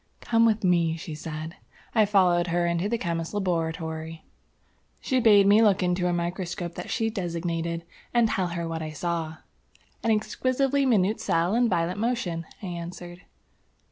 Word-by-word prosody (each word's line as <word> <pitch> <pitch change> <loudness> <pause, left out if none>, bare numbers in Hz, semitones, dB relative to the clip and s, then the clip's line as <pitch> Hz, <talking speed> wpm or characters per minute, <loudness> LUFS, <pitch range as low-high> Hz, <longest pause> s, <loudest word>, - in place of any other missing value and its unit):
"Come 230 0 +3
with 220 -1 +1
me," 170 -3 +2
she 165 -1 -7
said. 155 +2 -6 0.4
I 215 -3 +4
followed 180 -4 +3
her 175 0 +1
into 170 +3 0
the 235 - 0
Chemist's 170 -2 -3
Laboratory. 160 -3 -3 0.7
She 260 -2 0
bade 210 -4 +6
me 205 +3 +6
look 205 -4 +4
into 180 0 +1
a - - +1
microscope 175 0 -3
that 180 - -7
she 225 -1 0
designated, 170 -3 -3 0.3
and 240 -1 +4
tell 190 -4 0
her 170 -1 -4
what 165 0 -4
I 155 -1 -5
saw. 165 0 -3 0.6
"An 230 - -1
exquisitely 260 +5 +1
minute 215 -3 +2
cell 170 +3 +1
in 240 0 +3
violent 170 +2 0
motion," 200 -8 -2 0.2
I - - -4
answered. 175 0 -7
175 Hz, 160 wpm, -26 LUFS, 165-210 Hz, 0.7 s, bade